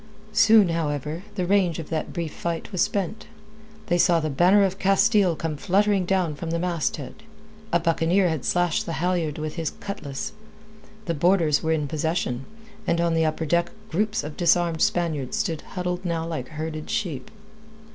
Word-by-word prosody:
Soon, 215 -3 +6
however, 155 -1 -2
the 185 -3 -1
rage 185 -3 +2
of 160 - -7
that 160 -1 -2
brief 165 -3 -4
fight 170 +3 -4
was 185 -3 -1
spent. 205 +2 -1 0.6
They 175 0 +1
saw 170 -1 +4
the 155 -1 -2
banner 180 +8 +5
of 195 0 -1
Castile 195 -2 +3
come 155 -1 -3
fluttering 200 +2 +2
down 185 -5 +1
from 165 +3 -6
the 165 - 0
masthead. 170 -3 -2 0.5
A 170 - +3
buccaneer 170 +3 +2
had 160 -5 -2
slashed 175 -1 +1
the 165 - -2
halyard 170 -3 -1
with 155 +1 -5
his 160 -3 -1
cutlass. 175 -6 -5 0.7
The 170 - -1
boarders 165 -2 +3
were 160 - 0
in 150 -2 0
possession, 150 -4 -2 0.4
and 170 - +2
on 170 -1 +2
the 165 0 +2
upper 155 +1 -1
deck 170 +3 +1 0.2
groups 210 +5 0
of 150 0 -6
disarmed 170 -2 +2
Spaniards 160 -7 0
stood 160 -2 -1
huddled 180 0 -4
now 165 -2 -1
like 165 -2 -4
herded 155 0 -5
sheep. 155 -11 -3
170 Hz, 170 wpm, -24 LUFS, 155-185 Hz, 0.7 s, Soon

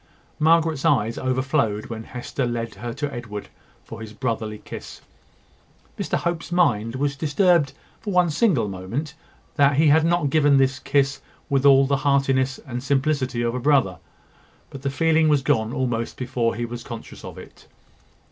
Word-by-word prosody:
Margaret's 160 -2 +3
eyes 115 -5 +2
overflowed 130 -4 0
when 110 -1 -7
Hester 125 +1 -4
led 115 -1 -3
her 120 +1 -6
to 145 0 -3
Edward 110 -4 -7 0.3
for - - -10
his 110 -1 -8
brotherly 110 -3 -3
kiss. - - -9 1.0
Mr - - -1
Hope's 170 0 -3
mind 120 -10 +2
was 140 +1 -1
disturbed 155 -1 +2 0.3
for 205 - -5
one 180 -3 +3
single 150 - +2
moment 100 +11 -5 0.4
that 140 -1 +4
he 155 0 +5
had 155 +2 +5
not 165 -4 +1
given 145 -2 +4
this 135 0 +2
kiss 135 -1 0 0.3
with 140 0 +3
all 135 0 +7
the 140 +1 +1
heartiness 135 -1 +1
and 125 -2 -5
simplicity 135 -3 0
of 115 0 0
a 125 - -2
brother; 125 - +2 0.7
but 135 - -9
the 140 - -1
feeling 160 +2 +2
was 145 -3 +3
gone 115 -6 +1
almost 120 -3 -2
before 125 -2 -1
he 120 +1 -2
was 120 0 -7
conscious 115 -2 -9
of - - -9
it. - - -14
135 Hz, 165 wpm, -23 LUFS, 120-150 Hz, 1.0 s, all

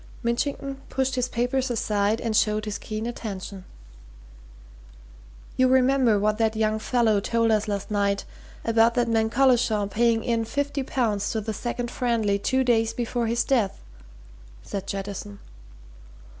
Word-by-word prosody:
Mitchington 275 +3 -2
pushed 265 0 0
his 250 -1 -1
papers 250 +2 0
aside 210 -2 0
and 225 -2 -2
showed 215 -1 +2
his 210 -1 -4
keen 215 +1 -5
attention. 200 -5 -6 1.9
"You 255 - +5
remember 260 -3 +4
what 210 +2 0
that 220 -1 +1
young 215 0 +1
fellow 225 -2 +2
told 230 +2 +1
us 215 0 +1
last 205 0 -3
night 200 -1 0 0.4
about 230 +1 +3
that 240 -1 +2
man 225 -1 +2
Collishaw 240 -4 +3
paying 225 +2 +1
in 230 -1 0
fifty 285 +3 -2
pounds 230 -6 -1
to 220 - -1
the 220 +1 -4
Second 240 +2 -4
Friendly 225 -5 0
two 260 +5 +1
days 225 -3 +2
before 240 -1 -1
his 235 +1 +1
death," 230 -8 0 0.8
said 195 -1 -5
Jettison. 200 +1 -5
225 Hz, 145 wpm, -25 LUFS, 210-245 Hz, 1.9 s, You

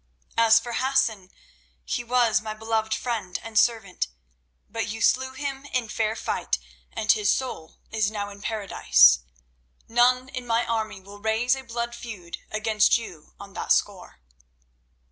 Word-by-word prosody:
"As 225 -1 +6
for 240 +1 -7
Hassan, 255 -7 +1 0.6
he 240 - -2
was 235 -3 +2
my 215 0 -5
beloved 220 0 -1
friend 220 -6 -2
and 225 -1 -9
servant, 220 - +1 0.6
but 225 -2 -3
you 225 +2 -5
slew 260 +4 +2
him 275 0 -5
in 250 -5 -2
fair 220 0 -1
fight, - - -1 0.3
and 215 -2 +2
his 210 -2 +2
soul 205 -12 -3
is 215 -2 +1
now 205 -1 -4
in 200 0 -12
Paradise. 65 - +4 0.7
None 250 +2 +3
in 255 -2 -6
my 230 +1 +2
army 220 -3 -2
will 200 +2 -13
raise 220 +4 +2
a 265 - -7
blood 235 -1 -4
feud 210 -8 -8
against 215 0 +3
you 180 -10 -11
on 200 -1 -11
that - - -4
score." 185 - 0
225 Hz, 150 wpm, -25 LUFS, 205-240 Hz, 0.7 s, As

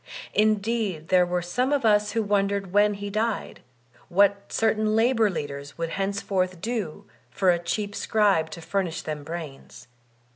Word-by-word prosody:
Indeed 210 -5 0
there 180 -1 +4
were 175 0 -1
some 250 +10 0
of 285 -5 +1
us 210 -1 +3
who 225 - +1
Dyer - - -3
D. - - +1
Lum 200 -1 +3
285 200 -2 -3
wondered - - -16
when 205 0 +4
he 200 0 -5
died, 215 +1 -2 0.5
what 200 +2 +2
certain 215 -1 +1
labor 225 -1 +3
leaders 145 -5 -6
would 165 -1 -2
henceforth 195 -2 -1
do 205 -3 -4 0.2
for 190 -2 +2
a 170 - +1
cheap 200 +4 -3
scribe 200 -8 +2
to 170 - -8
furnish 175 -2 -2
them 150 -2 -5
brains. 145 -7 -8
200 Hz, 175 wpm, -25 LUFS, 175-215 Hz, 0.5 s, there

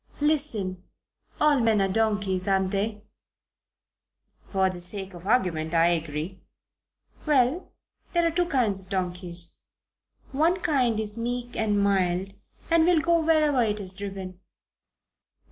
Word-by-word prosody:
"Listen. 255 - 0 0.6
All 300 -2 +4
men 225 -3 +3
are 195 - +3
donkeys, 205 -2 0
aren't 190 -1 +2
they?" 205 +1 -2 1.5
"For 190 -1 +2
the 185 -1 -5
sake 190 +1 -6
of 175 +2 -10
argument, 175 -8 +1
I 165 +1 +5
agree." 165 +2 -3 0.9
"Well 285 +4 +2 0.4
there 345 -1 +2
are 335 - +2
two 350 +1 +1
kinds 235 - +1
of 190 -1 -17
donkeys. 180 -2 -3 0.7
One 325 +7 +2
kind 255 -9 +1
is 215 +1 -4
meek 245 +1 -3
and 210 -2 +1
mild 190 -1 +1 0.4
and 335 -1 +5
will 350 -2 +5
go 335 +1 +3
wherever 310 -4 +3
it 210 -2 0
is 190 -2 -6
driven. 190 -2 -7
205 Hz, 130 wpm, -26 LUFS, 185-265 Hz, 1.5 s, I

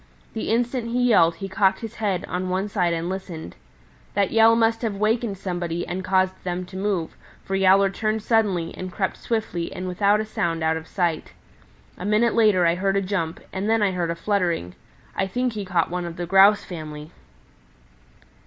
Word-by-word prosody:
The - - -3
instant 240 +1 0
he 245 +1 +1
yelled 165 -7 +5
he 195 +3 -6
cocked 190 0 +1
his 225 -1 -6
head 200 -5 -1
on 185 +1 -3
one 190 +2 -1
side 185 -4 0
and 165 0 -2
listened. 180 - -6 0.6
That 200 -1 +2
yell 225 0 +6
must 225 0 +2
have 220 -4 -2
wakened 215 0 0
somebody 175 -3 -3
and 185 +2 -4
caused 185 0 +1
them 180 0 -3
to 185 - -13
move, 190 -4 -2 0.3
for 195 - -5
Yowler 195 0 +4
turned 215 +1 -2
suddenly 205 -8 +1
and 185 0 -6
crept 190 0 -2
swiftly 215 -7 -3
and 185 - -5
without 200 +3 +2
a 215 - -2
sound 165 -6 -2
out 160 0 +2
of 160 0 -6
sight. 175 -5 -2 0.7
A - - -6
minute 215 +2 +3
later 210 -6 +4
I 170 - +4
heard 195 +2 0
a - - +2
jump, 185 -4 -2
and 195 +3 -2
then 225 -1 +3
I 200 - +2
heard 175 -2 -2
a 170 - -1
fluttering. 170 - -1 0.4
I 195 - 0
think 250 +4 -1
he 210 -2 -4
caught 175 -3 0
one 180 0 -2
of 170 -1 -6
the 175 - -3
Grouse 195 +3 +6
family." 155 -3 -8
190 Hz, 195 wpm, -23 LUFS, 175-210 Hz, 0.7 s, yell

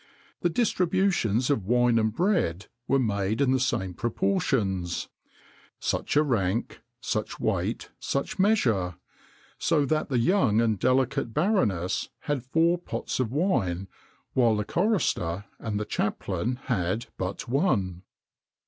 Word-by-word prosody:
The 175 - +1
distributions 175 - +1
of 110 -9 -1
wine 120 0 +4
and 110 0 +1
bread 115 - 0 0.2
were 135 - +3
made 105 -3 0
in 140 -2 +3
the 130 - +3
same 95 -8 -1
proportions; 115 - -1 0.7
such - - -1
a 150 - +5
rank, 115 -6 -1 0.2
such - - -3
weight, - - -1
such 140 +6 -2
measure; 115 - +2 0.6
so 155 -3 +2
that 155 +2 0
the 130 - +1
young 120 - +3
and 110 -4 +2
delicate 130 -2 +1
baroness 110 - +1
had 145 -3 -1
four 165 +7 +2
pots 175 - -4
of 120 -3 0
wine, 100 - 0 0.5
while 120 -4 +4
the 105 -1 -1
chorister 140 - 0
and 105 -2 -3
the 105 - -2
chaplain 105 +2 -2
had 105 -1 -1
but 95 +1 -3
one. 115 - +1
120 Hz, 130 wpm, -27 LUFS, 100-155 Hz, 0.7 s, a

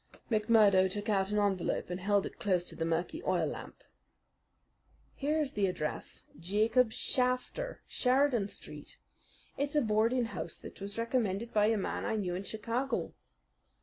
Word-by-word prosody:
McMurdo 210 -4 +5
took 205 +2 -3
out 195 -2 +2
an 210 - 0
envelope 195 -3 0
and 180 - -3
held 200 +1 +2
it - - -8
close 185 -4 +1
to - - -8
the 165 - -2
murky 170 - -1
oil - - +1
lamp. - - -7 1.3
"Here 295 +3 0
is 290 -3 0
the 200 -2 +2
address 155 -4 -4 0.2
Jacob 220 +7 +2
Shafter, 255 - -1
Sheridan 255 -4 +2
Street. - - -9 0.6
It's 285 +1 -1
a 295 - +5
boarding 225 +3 +2
house 230 - -5
that - - -11
was 200 +2 -6
recommended 230 -2 -1
by 210 -1 +4
a 225 0 +2
man 195 - -2
I - - -1
knew 190 -5 -1
in 180 - -2
Chicago." 230 +6 -2
215 Hz, 155 wpm, -32 LUFS, 195-250 Hz, 1.3 s, McMurdo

